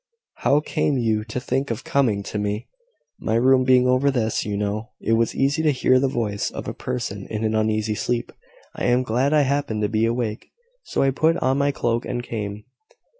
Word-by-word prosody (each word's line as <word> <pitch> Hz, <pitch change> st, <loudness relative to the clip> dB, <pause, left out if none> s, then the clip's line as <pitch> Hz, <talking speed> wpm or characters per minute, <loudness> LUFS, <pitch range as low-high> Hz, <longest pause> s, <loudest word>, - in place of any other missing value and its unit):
How 145 Hz, +2 st, +3 dB
came 145 Hz, -2 st, 0 dB
you 110 Hz, -3 st, +1 dB
to 115 Hz, +2 st, -4 dB
think 135 Hz, +2 st, -2 dB
of 115 Hz, +1 st, -3 dB
coming 135 Hz, -11 st, +1 dB
to 105 Hz, -, -4 dB
me?" 105 Hz, +2 st, -2 dB, 0.5 s
"My 110 Hz, -, -1 dB
room 130 Hz, +2 st, +4 dB
being 125 Hz, -1 st, +4 dB
over 130 Hz, +2 st, +3 dB
this, 115 Hz, -5 st, 0 dB
you 105 Hz, -1 st, -3 dB
know, 105 Hz, +2 st, -2 dB
it -, -, -2 dB
was 115 Hz, 0 st, +1 dB
easy 140 Hz, +4 st, +1 dB
to 155 Hz, -, +3 dB
hear 130 Hz, -2 st, +3 dB
the 135 Hz, -, +2 dB
voice 105 Hz, -5 st, -2 dB
of -, -, -7 dB
a -, -, -3 dB
person 120 Hz, -6 st, -4 dB
in 110 Hz, 0 st, -4 dB
an 110 Hz, 0 st, 0 dB
uneasy 110 Hz, 0 st, +1 dB
sleep. 120 Hz, +2 st, -2 dB, 0.4 s
I -, -, -3 dB
am 125 Hz, +1 st, +3 dB
glad 125 Hz, +4 st, +1 dB
I 155 Hz, -1 st, +5 dB
happened 140 Hz, -6 st, 0 dB
to 105 Hz, -, +1 dB
be 110 Hz, 0 st, +1 dB
awake: 115 Hz, -2 st, -3 dB, 0.3 s
so -, -, -1 dB
I 135 Hz, -, +3 dB
put 160 Hz, +5 st, +2 dB
on 135 Hz, -1 st, +1 dB
my 140 Hz, 0 st, +2 dB
cloak 120 Hz, -3 st, -1 dB
and 120 Hz, -1 st, -3 dB
came." 105 Hz, -3 st, -5 dB
120 Hz, 210 wpm, -23 LUFS, 110-135 Hz, 0.5 s, I